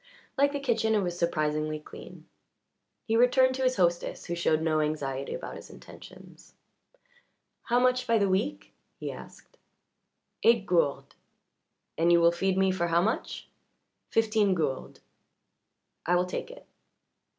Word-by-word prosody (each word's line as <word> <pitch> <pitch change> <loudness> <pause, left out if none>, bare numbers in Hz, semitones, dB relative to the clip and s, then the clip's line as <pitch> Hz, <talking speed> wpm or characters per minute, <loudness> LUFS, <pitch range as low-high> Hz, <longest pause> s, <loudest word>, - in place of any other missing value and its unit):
Like 280 0 +3
the 285 - -3
kitchen 225 -5 +1
it 210 - +2
was 175 -2 -3
surprisingly 155 -2 -1
clean. 150 - -13 0.8
He 225 - 0
returned 255 +2 +4
to 265 - -4
his 255 0 +2
hostess, 175 -2 0
who 170 - -4
showed 170 -2 +1
no 160 -1 0
anxiety 140 -3 -2
about - - -7
his - - -12
intentions. - - -15 1.1
"How 240 +1 +2
much 250 0 +1
by 230 - +3
the 200 -2 +2
week?" 195 +10 -2 0.3
he - - -4
asked. - - -14 0.8
"Eight 230 -3 +4
gourdes." 145 -6 0 0.9
"And 170 +1 +3
you 170 - +6
will 170 0 +5
feed 190 +2 -1
me 190 0 +3
for 180 -2 -1
how 170 +1 +2
much?" 220 - -3 0.6
"Fifteen 215 -3 +2
gourdes." 145 -6 -3 1.1
"I 175 - +3
will 180 0 +2
take 180 - -5
it." - - -13
185 Hz, 145 wpm, -28 LUFS, 165-230 Hz, 1.1 s, you